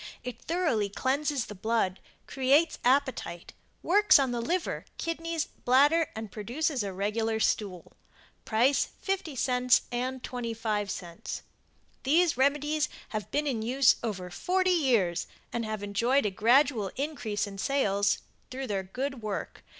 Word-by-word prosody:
It 245 Hz, -1 st, -7 dB
thoroughly 315 Hz, -, 0 dB
cleanses 275 Hz, +4 st, 0 dB
the -, -, -8 dB
blood, 205 Hz, -2 st, 0 dB, 0.3 s
creates 275 Hz, +5 st, +2 dB
appetite, 260 Hz, -9 st, 0 dB, 0.3 s
works 415 Hz, +4 st, +6 dB
on 270 Hz, -3 st, +1 dB
the 240 Hz, -1 st, -2 dB
liver, 345 Hz, +9 st, -2 dB
kidneys, 330 Hz, -1 st, -2 dB
bladder 290 Hz, +6 st, +3 dB
and 220 Hz, -2 st, -6 dB
produces 255 Hz, -, -1 dB
a 200 Hz, -1 st, -3 dB
regular 220 Hz, +4 st, -1 dB
stool. 195 Hz, -5 st, -1 dB, 0.5 s
Price, 245 Hz, +6 st, +2 dB, 0.2 s
50c 255 Hz, -, +2 dB
and 255 Hz, +1 st, -3 dB
25c. 215 Hz, -7 st, -4 dB, 0.6 s
These 325 Hz, +5 st, +3 dB
remedies 295 Hz, +3 st, +1 dB, 0.2 s
have 215 Hz, -2 st, -4 dB
been 295 Hz, +1 st, 0 dB
in 250 Hz, -6 st, -1 dB
use 255 Hz, +3 st, +4 dB
over 185 Hz, -6 st, -4 dB
40 370 Hz, -, +1 dB
years 235 Hz, -, +2 dB, 0.3 s
and 235 Hz, -1 st, -1 dB
have 215 Hz, -1 st, -4 dB
enjoyed 230 Hz, +7 st, +1 dB
a 205 Hz, -, +1 dB
gradual 235 Hz, 0 st, +3 dB
increase 250 Hz, -8 st, -2 dB
in 195 Hz, -1 st, -9 dB
sales 205 Hz, -4 st, +1 dB, 0.3 s
through 265 Hz, +1 st, -5 dB
their 200 Hz, -5 st, -1 dB
good 255 Hz, +7 st, -4 dB
work. 215 Hz, -2 st, -5 dB
250 Hz, 130 wpm, -29 LUFS, 210-285 Hz, 0.6 s, works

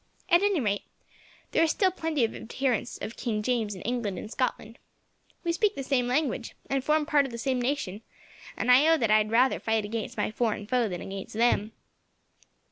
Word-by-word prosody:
At 345 Hz, 0 st, +6 dB
any 405 Hz, -4 st, +2 dB
rate, 205 Hz, -5 st, 0 dB, 0.7 s
there -, -, +3 dB
are -, -, +4 dB
still 375 Hz, +4 st, +2 dB
plenty 320 Hz, -7 st, 0 dB
of 225 Hz, -, -5 dB
adherents 250 Hz, 0 st, -2 dB
of 225 Hz, -, -6 dB
King 215 Hz, -3 st, -2 dB
James 225 Hz, -4 st, 0 dB
in 185 Hz, -, -9 dB
England 230 Hz, -5 st, -2 dB
and 215 Hz, -, -7 dB
Scotland. 235 Hz, -3 st, -3 dB, 0.6 s
We 340 Hz, -, +1 dB
speak 415 Hz, +4 st, +1 dB
the 275 Hz, -, -4 dB
same 255 Hz, -2 st, +1 dB
language, 255 Hz, -2 st, -1 dB, 0.2 s
and 270 Hz, -1 st, +1 dB
form 305 Hz, +1 st, +2 dB
part 290 Hz, -3 st, +3 dB
of -, -, -10 dB
the 235 Hz, -, -6 dB
same 255 Hz, +1 st, -1 dB
nation, 245 Hz, -6 st, -2 dB, 0.6 s
and 250 Hz, -, +2 dB
I 265 Hz, +5 st, +7 dB
own 325 Hz, -1 st, +5 dB
that 225 Hz, -2 st, +2 dB
I 215 Hz, -, +6 dB
would 215 Hz, -, -3 dB
rather 250 Hz, +4 st, +3 dB
fight 220 Hz, -1 st, 0 dB
against 220 Hz, +1 st, -4 dB
any -, -, 0 dB
foreign 220 Hz, -2 st, -1 dB
foe 235 Hz, 0 st, +1 dB
than 175 Hz, -2 st, -5 dB
against 195 Hz, +1 st, -7 dB
them." 225 Hz, -2 st, +2 dB
245 Hz, 205 wpm, -28 LUFS, 220-285 Hz, 0.7 s, I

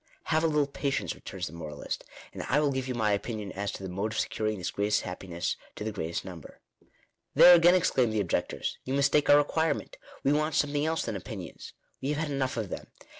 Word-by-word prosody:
" -, -, -39 dB
Have 160 Hz, +1 st, +3 dB
a -, -, +4 dB
little 150 Hz, -2 st, +2 dB
patience," 140 Hz, 0 st, -2 dB
returns -, -, -6 dB
the 75 Hz, -, -7 dB
moralist, 75 Hz, -3 st, -5 dB, 0.2 s
" -, -, -18 dB
and -, -, -5 dB
I 145 Hz, -, +4 dB
will 150 Hz, -2 st, +2 dB
give 130 Hz, -1 st, -2 dB
you 125 Hz, -, -2 dB
my 110 Hz, -3 st, +2 dB
opinion 105 Hz, 0 st, -2 dB
as 100 Hz, 0 st, -3 dB
to -, -, -7 dB
the -, -, -3 dB
mode 100 Hz, +5 st, -2 dB
of -, -, -1 dB
securing 110 Hz, -1 st, -1 dB
this 90 Hz, -, -3 dB
greatest 105 Hz, +1 st, +1 dB
happiness 90 Hz, -1 st, -4 dB, 0.2 s
to -, -, -5 dB
the 110 Hz, -, -2 dB
greatest 85 Hz, -5 st, -4 dB
number." 90 Hz, -5 st, -10 dB, 0.4 s
" -, -, -40 dB
There 180 Hz, -, +10 dB
again," 175 Hz, +1 st, +7 dB
exclaim 130 Hz, -9 st, +3 dB
the 110 Hz, -1 st, 0 dB
objectors, 95 Hz, -5 st, -2 dB
" -, -, -42 dB
you 130 Hz, -, -2 dB
mistake 140 Hz, +1 st, +3 dB
our 145 Hz, -, +9 dB
requirement. 160 Hz, +2 st, 0 dB, 0.3 s
We 140 Hz, -, +3 dB
want 155 Hz, +1 st, +1 dB
something 145 Hz, +1 st, +1 dB
else 160 Hz, 0 st, 0 dB
than 115 Hz, -, -3 dB
opinions. 95 Hz, -1 st, -8 dB, 0.3 s
We 135 Hz, -, -2 dB
have -, -, -3 dB
had 155 Hz, -1 st, -2 dB
enough 130 Hz, -3 st, -1 dB
of 110 Hz, -4 st, -2 dB
them. -, -, -6 dB
120 Hz, 235 wpm, -29 LUFS, 100-145 Hz, 0.4 s, There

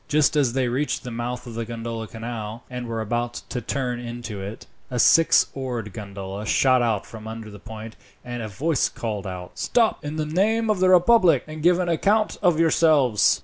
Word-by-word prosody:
Just 150 Hz, 0 st, +3 dB
as 135 Hz, -5 st, +2 dB
they 130 Hz, -1 st, +1 dB
reached 130 Hz, +5 st, -1 dB
the 125 Hz, -, -6 dB
mouth 120 Hz, +2 st, -4 dB
of 120 Hz, -, -8 dB
the 115 Hz, +1 st, -3 dB
Grand 115 Hz, 0 st, -7 dB, 0.2 s
Canal, 115 Hz, 0 st, -6 dB
and 125 Hz, -1 st, -5 dB
were 115 Hz, -1 st, -3 dB
about 120 Hz, +2 st, -2 dB
to 125 Hz, -, -3 dB
turn 125 Hz, 0 st, -2 dB
into 120 Hz, -4 st, -6 dB
it, 100 Hz, +3 st, -7 dB, 0.2 s
a 125 Hz, -, -3 dB
six 165 Hz, +7 st, +5 dB
oared 120 Hz, -6 st, -4 dB
gondola 100 Hz, 0 st, -6 dB
shot 130 Hz, +2 st, +4 dB
out 110 Hz, -4 st, 0 dB
from 110 Hz, -1 st, -10 dB
under 110 Hz, -1 st, -7 dB
the 105 Hz, -, -11 dB
point, 110 Hz, +1 st, -9 dB, 0.3 s
and 120 Hz, -1 st, -5 dB
a 110 Hz, -, -4 dB
voice 140 Hz, +8 st, 0 dB
called 105 Hz, -4 st, -4 dB
out: 90 Hz, -1 st, -8 dB
"Stop, 230 Hz, -3 st, +1 dB
in 145 Hz, +1 st, -4 dB
the 155 Hz, -1 st, -1 dB
name 215 Hz, +8 st, +1 dB
of 205 Hz, -, -1 dB
the 185 Hz, 0 st, +4 dB
republic, 180 Hz, -, +5 dB
and 155 Hz, 0 st, -8 dB
give 175 Hz, +2 st, +4 dB
an 180 Hz, -1 st, -1 dB
account 205 Hz, +6 st, +1 dB
of 175 Hz, -5 st, +3 dB
yourselves!" 155 Hz, -9 st, +4 dB
120 Hz, 200 wpm, -24 LUFS, 110-155 Hz, 0.3 s, six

